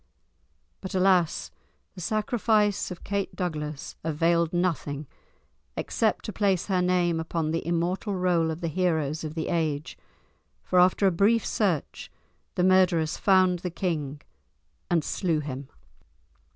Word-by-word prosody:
But 190 -1 -6
alas! 185 -3 +2 0.4
the 180 - -9
sacrifice 215 0 +1
of 180 -2 -8
Kate 200 -1 -2
Douglas 150 -5 -4
availed 165 +1 +1
nothing 165 -5 -1 0.7
except 220 -2 0
to 215 - -5
place 195 -3 +1
her 185 -3 +1
name 180 -2 +2
upon 160 -1 -2
the 165 - -1
immortal 175 +4 -1
roll 175 -3 +2
of 160 +2 -4
the 170 - -1
heroes 160 -3 0
of 155 0 -5
the 160 - -3
ages, 155 -3 -1 0.7
for 180 - +2
after 185 +2 +4
a 190 - +5
brief 205 +6 +3
search 185 -9 -1 0.4
the 180 - +1
murderers 180 -4 +3
found 185 -2 +4
the 180 - -3
king 155 -5 -3 0.7
and 170 -3 +2
slew 165 -2 0
him. 140 -2 -6
175 Hz, 135 wpm, -26 LUFS, 160-185 Hz, 0.7 s, a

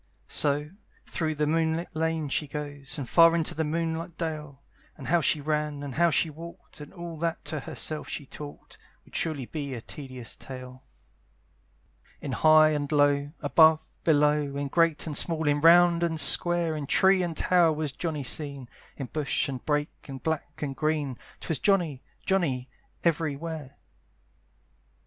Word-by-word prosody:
So, 150 +1 +1 0.3
through 155 -3 -2
the 150 0 0
moonlight 160 +1 0
lane 160 -1 -1
she 145 +2 -1
goes, 145 -2 -6
And 140 -4 -4
far 165 +3 +6
into 165 -2 -1
the 160 - -1
moonlight 165 +1 -3
dale; 150 -4 -5 0.3
And 130 -4 -7
how 170 +1 +4
she 150 - +2
ran, 150 -1 -2
and 140 -2 -5
how 170 +4 +3
she 165 +2 +2
walked, 165 0 -11
And 145 - -10
all 170 -3 -8
that 165 +1 -2
to 155 - -3
herself 155 +1 -5
she 145 - -5
talked, 145 +2 -10 0.3
Would - - -17
surely 150 -6 -1
be 140 -1 -5
a - - -5
tedious 130 -3 -8
tale. 130 -1 -10 1.4
In - - -5
high 155 0 +6
and 145 -1 -2
low, 145 -1 +3
above, 160 +1 +5
below, 150 -2 +2
In 140 0 -2
great 165 0 +2
and 155 -3 -4
small, 160 0 +2
in 145 0 +2
round 170 +1 +6
and 165 -2 0
square, 170 +2 +3
In 145 -2 -4
tree 190 +4 +4
and 170 -3 -3
tower 175 -3 +4
was 155 -2 -2
Johnny 155 -1 -3
seen, 140 -2 -3 0.3
In 135 - -4
bush 150 +3 -1
and 130 -3 -5
brake, 150 0 -1
in 135 -3 -7
black 150 0 -4
and 135 -2 -3
green, 150 -3 -1 0.3
'Twas 160 - -3
Johnny, 175 -10 +1 0.2
Johnny, 145 -10 0 0.4
every 160 -3 +1
where. 150 -3 -7
155 Hz, 165 wpm, -27 LUFS, 145-165 Hz, 1.4 s, far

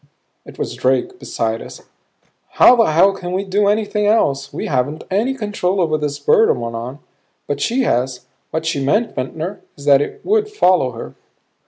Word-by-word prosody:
It - - -12
was - - -3
Drake 130 0 0
beside 115 0 -3
us. - - -11 0.7
"How 250 - +7
the 230 -2 +4
hell 175 +6 +4
can 180 -2 -6
we 190 +2 -1
do 200 +1 +1
anything 210 0 0
else? 140 -11 +1
We - - -5
haven't 145 +3 -1
any 230 +8 +1
control 205 -5 -2
over 160 -3 +1
this 150 -2 -2
bird 145 +9 +3
we're 115 -1 -5
on. 120 +4 -6 0.5
But 145 0 -3
she 255 - +1
has. 125 - -1 0.2
What 160 0 -3
she 140 -4 -1
meant, 210 - +1
Ventnor, 160 +9 -5 0.2
is 140 - -11
that 140 -1 +5
it - - -5
would 425 +1 +1
follow 185 - +2
her." 115 - -8
160 Hz, 180 wpm, -18 LUFS, 135-205 Hz, 0.7 s, How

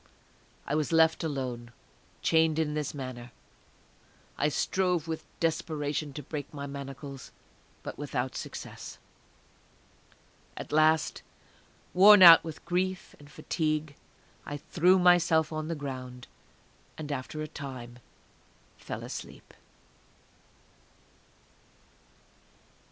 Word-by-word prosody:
I - - -3
was 150 0 0
left 160 0 +4
alone, 130 -6 -4 0.5
chained 160 -1 +3
in 155 -2 0
this 150 -1 -3
manner. 125 -3 -7 1.0
I 145 - +1
strove 180 +1 0
with 160 -1 -5
desperation 155 -2 -1
to 150 - -7
break 145 0 -6
my 140 -1 -6
manacles, 140 -1 -8 0.5
but - - -7
without 130 -3 -3
success. - - -7 1.6
At - - -7
last, 155 +1 +3 0.7
worn 200 +1 +8
out 165 -2 +11
with 160 -2 -8
grief 185 +1 -2
and 145 0 -15
fatigue, 155 +1 -2 0.5
I 145 - -5
threw 180 +5 +3
myself 175 -3 +4
on 155 0 -3
the 165 - -2
ground, 130 -4 -7 0.7
and 150 -2 -6
after 145 +3 -4
a - - -5
time 125 -4 -8 0.8
fell - - -7
asleep. - - -9
150 Hz, 100 wpm, -29 LUFS, 140-160 Hz, 1.6 s, out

